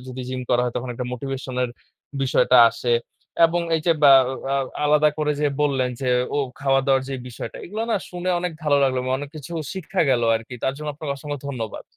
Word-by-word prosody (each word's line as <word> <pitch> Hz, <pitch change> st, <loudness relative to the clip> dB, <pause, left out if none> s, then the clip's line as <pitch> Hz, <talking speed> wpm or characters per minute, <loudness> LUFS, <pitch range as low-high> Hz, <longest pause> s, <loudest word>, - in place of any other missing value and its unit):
যদি 130 Hz, 0 st, -7 dB
জিম 130 Hz, 0 st, -3 dB
করা 120 Hz, 0 st, +4 dB
হয়, 125 Hz, -, -2 dB
তখন 125 Hz, +1 st, -3 dB
একটা 125 Hz, -, -4 dB
মোটিভেশন 135 Hz, +1 st, -5 dB
এর 120 Hz, -, -1 dB, 0.5 s
বিষয়টা 125 Hz, -1 st, +3 dB
আসে। 120 Hz, -1 st, -2 dB, 0.5 s
এবং 175 Hz, +1 st, -1 dB, 0.2 s
এই 160 Hz, -, -2 dB
যে 170 Hz, -, +6 dB
ব্যা 140 Hz, -2 st, +9 dB
আ 130 Hz, -, -3 dB, 0.2 s
আও 135 Hz, -, 0 dB, 0.2 s
আলাদা 150 Hz, +1 st, +4 dB
করে 150 Hz, -1 st, +1 dB
যে 150 Hz, -, +3 dB, 0.2 s
বললেন 135 Hz, -3 st, +1 dB
যে, 130 Hz, -, -1 dB, 0.3 s
ও -, -, +2 dB, 0.2 s
খাওয়া-দাওয়ার 135 Hz, -1 st, +2 dB
যে 135 Hz, -, -3 dB
বিষয়টা, 120 Hz, -, -7 dB
এগুলো 215 Hz, +5 st, -4 dB
না 225 Hz, -, +3 dB
শুনে 180 Hz, 0 st, -4 dB
অনেক 180 Hz, -1 st, -2 dB
ভালো 145 Hz, -2 st, +3 dB
লাগলো। 130 Hz, -1 st, +1 dB, 0.2 s
অনেক 145 Hz, -, -6 dB
কিছু 150 Hz, +3 st, -9 dB, 0.2 s
শিক্ষা 190 Hz, 0 st, -3 dB
গেল 120 Hz, -2 st, +2 dB
আরকি। 115 Hz, +3 st, -9 dB
তার 135 Hz, -, +1 dB
জন্য 150 Hz, +1 st, -6 dB
আপনাকে 145 Hz, -1 st, -4 dB
অসংখ্য 145 Hz, +1 st, -5 dB
ধন্যবাদ। 115 Hz, -6 st, -5 dB
135 Hz, 205 wpm, -23 LUFS, 130-150 Hz, 0.5 s, ব্যা